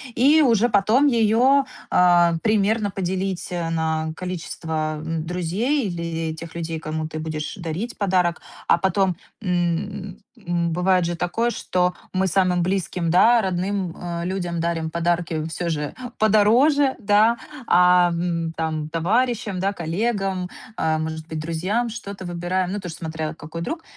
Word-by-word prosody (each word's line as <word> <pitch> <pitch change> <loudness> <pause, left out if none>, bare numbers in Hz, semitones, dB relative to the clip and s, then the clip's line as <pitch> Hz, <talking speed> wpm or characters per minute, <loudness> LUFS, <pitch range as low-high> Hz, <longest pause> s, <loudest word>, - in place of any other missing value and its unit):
И 290 +6 +5
уже 240 -4 +4
потом 220 +8 +4
её, 245 +3 +4 0.3
а, 175 -1 +5
примерно 215 0 +2
поделить, 190 -1 -2
э, 170 -2 -2
на 160 -1 -1
количество, 160 -3 -3
м, 160 -1 -3
друзей, 195 - -1
или 165 -2 -3
тех 160 +1 -9
людей, 165 -1 -3
кому 155 0 -3
ты 155 - -5
будешь 155 -1 -4
дарить 175 +7 -4
подарок. 180 -4 +1 0.3
А - - +6
потом, 190 0 +1 0.2
м, 185 +1 -2 0.2
м, 175 -5 -1
бывает 180 +2 +2
же 175 0 -2
такое, 180 +8 0
что 180 -5 0 0.2
мы 190 0 +1
самым 185 -1 +2
близким, 180 -2 -1
да 225 +8 +5
родным, 185 -1 -2
э, 170 -1 -4
людям 175 -2 -2
дарим 165 -1 -1
подарки 170 -2 0
всё 170 +2 -3
же 150 -2 -2 0.3
подороже, 245 +7 +4
да, 215 +2 +4 0.3
ам, 180 -2 +5
м, 165 -2 -1
там 155 -1 -2
товарищам, 210 +4 0
да 195 +2 0
коллегам, 190 +1 -1 0.3
э, 160 -1 +1
может 160 0 -4
быть, 160 -1 -5
друзьям 180 +9 -1
что-то 200 -4 -7
выбираем, 175 +1 -2
ну 205 - -2
тоже 180 -4 -6
смотря 160 -1 -4
какой 155 +1 -8
друг, 320 - -4
180 Hz, 145 wpm, -23 LUFS, 165-205 Hz, 0.3 s, А